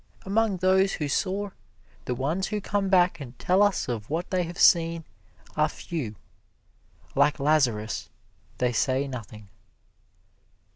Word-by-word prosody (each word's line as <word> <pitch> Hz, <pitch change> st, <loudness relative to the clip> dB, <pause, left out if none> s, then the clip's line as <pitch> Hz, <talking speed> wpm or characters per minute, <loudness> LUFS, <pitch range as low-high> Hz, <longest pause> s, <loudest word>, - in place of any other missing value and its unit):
Among 205 Hz, 0 st, +1 dB
those 190 Hz, +1 st, +3 dB
who 150 Hz, -, -2 dB
soar, 195 Hz, +7 st, -1 dB, 0.5 s
the 125 Hz, -, -2 dB
ones 155 Hz, +9 st, -1 dB
who 210 Hz, -1 st, -2 dB
come 200 Hz, -1 st, -1 dB
back 180 Hz, -2 st, +4 dB
and 125 Hz, -4 st, -9 dB
tell 185 Hz, +2 st, +2 dB
us 205 Hz, -6 st, +2 dB
of 115 Hz, -4 st, -4 dB
what 165 Hz, +4 st, -3 dB
they 185 Hz, -1 st, +2 dB
have 175 Hz, +1 st, -8 dB
seen, 165 Hz, -1 st, +4 dB, 0.5 s
are 155 Hz, 0 st, +2 dB
few. 145 Hz, -10 st, -5 dB, 1.0 s
Like 145 Hz, +2 st, +3 dB
Lazarus, 125 Hz, -8 st, +1 dB, 0.5 s
they 125 Hz, -1 st, +1 dB
say 130 Hz, +4 st, +1 dB
nothing. 110 Hz, -5 st, -8 dB
160 Hz, 135 wpm, -26 LUFS, 130-190 Hz, 1.0 s, back